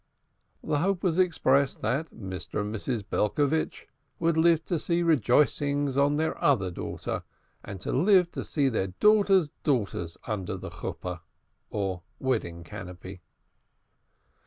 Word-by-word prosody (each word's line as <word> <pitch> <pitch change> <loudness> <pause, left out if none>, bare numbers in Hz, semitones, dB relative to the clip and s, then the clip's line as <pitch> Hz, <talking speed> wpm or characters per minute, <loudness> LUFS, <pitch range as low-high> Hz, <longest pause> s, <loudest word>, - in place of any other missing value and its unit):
The 145 - 0
hope 185 +2 0
was 180 -2 +1
expressed 140 -6 +2
that 155 +5 0
Mr. 95 -2 -5
and 105 +1 -4
Mrs. 110 0 -2
Belcovitch 145 +11 0 0.3
would 165 -1 +1
live 165 0 +4
to 170 - -1
see 170 +2 0
"rejoicings" 145 -1 +2
on 140 +1 +3
their 160 +1 -1
other 100 -10 +3
daughter, - - -4 0.4
and 95 - -7
to 180 - +3
see 145 -3 +1
their 110 -7 0
daughters' 195 - +4
daughters 100 - -1
under 100 -2 -3
the - - -7
Chuppah, 90 -2 -6 0.5
or 95 -3 -2 0.2
wedding 110 -10 -2
canopy. 90 +2 -9
140 Hz, 125 wpm, -28 LUFS, 95-160 Hz, 0.5 s, live